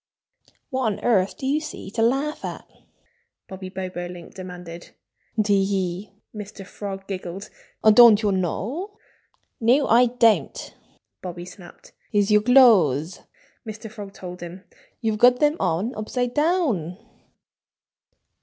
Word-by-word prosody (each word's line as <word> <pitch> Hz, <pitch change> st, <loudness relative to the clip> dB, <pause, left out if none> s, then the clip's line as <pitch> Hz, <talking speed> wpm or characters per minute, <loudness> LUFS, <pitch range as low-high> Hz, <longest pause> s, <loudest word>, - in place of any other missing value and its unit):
"What 260 Hz, -1 st, -1 dB
on 210 Hz, -, -2 dB
earth 200 Hz, -5 st, +1 dB
do -, -, -6 dB
you 285 Hz, +3 st, +1 dB
see 300 Hz, -10 st, -8 dB
to 225 Hz, -, -2 dB
laugh 270 Hz, +6 st, 0 dB
at?" -, -, -6 dB, 0.8 s
Bobby 190 Hz, 0 st, -8 dB
Bobolink 180 Hz, -2 st, -7 dB
demanded. 180 Hz, -2 st, -10 dB, 0.5 s
"Tee 200 Hz, -2 st, +2 dB
hee!" 195 Hz, 0 st, -2 dB, 0.2 s
Mr. 205 Hz, -2 st, -9 dB
Frog 195 Hz, -1 st, -7 dB
giggled. 190 Hz, 0 st, -7 dB, 0.3 s
"Don't 220 Hz, 0 st, +7 dB
you 205 Hz, -, +2 dB
know?" 245 Hz, -, -3 dB, 0.6 s
"No, 255 Hz, +5 st, +3 dB
I 245 Hz, +2 st, +5 dB
don't!" 230 Hz, -2 st, +1 dB, 0.5 s
Bobby 175 Hz, -1 st, -7 dB
snapped. 180 Hz, -1 st, -14 dB, 0.2 s
"It's 205 Hz, 0 st, +2 dB
your 210 Hz, 0 st, +5 dB
clothes!" 195 Hz, -, +4 dB, 0.4 s
Mr. 220 Hz, -1 st, -8 dB
Frog 205 Hz, -3 st, -9 dB
told 180 Hz, -2 st, -9 dB
him. 175 Hz, +2 st, -9 dB, 0.4 s
"You've 220 Hz, -2 st, -1 dB
got 250 Hz, +1 st, +6 dB
them 295 Hz, +1 st, +3 dB
on 195 Hz, +10 st, -1 dB
upside 245 Hz, +3 st, -3 dB
down!" 290 Hz, -, 0 dB
205 Hz, 125 wpm, -23 LUFS, 185-245 Hz, 0.8 s, Don't